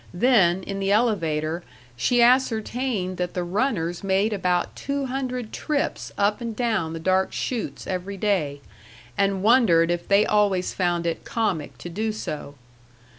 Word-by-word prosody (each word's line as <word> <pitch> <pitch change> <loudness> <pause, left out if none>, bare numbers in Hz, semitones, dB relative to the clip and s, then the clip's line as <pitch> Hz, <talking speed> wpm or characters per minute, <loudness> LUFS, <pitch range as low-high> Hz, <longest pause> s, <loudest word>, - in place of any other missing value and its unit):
Then, 190 -5 +4
in 195 +1 -5
the 195 0 0
elevator, 170 -8 +1 0.3
she 240 - +3
ascertained 235 -5 +1
that 180 0 -3
the 180 - -1
runners 175 -3 -1
made 195 +3 +1
about 180 -3 0
two 280 0 -3
hundred 255 -3 -4
trips 300 -2 -2
up 205 +3 +1
and 230 -2 -4
down 215 -9 0
the 165 - -5
dark 185 +3 +1
chutes 240 -4 -3
every 190 +1 -4
day, 170 -9 0 0.5
and 195 -1 +1
wondered 200 -8 +5
if 175 0 -3
they 200 +1 +4
always 200 -3 +1
found 175 -2 0
it 165 -1 -2
comic 215 -9 -2
to - - -8
do 215 +6 -2
so. 150 -8 -6
195 Hz, 150 wpm, -24 LUFS, 175-230 Hz, 0.5 s, wondered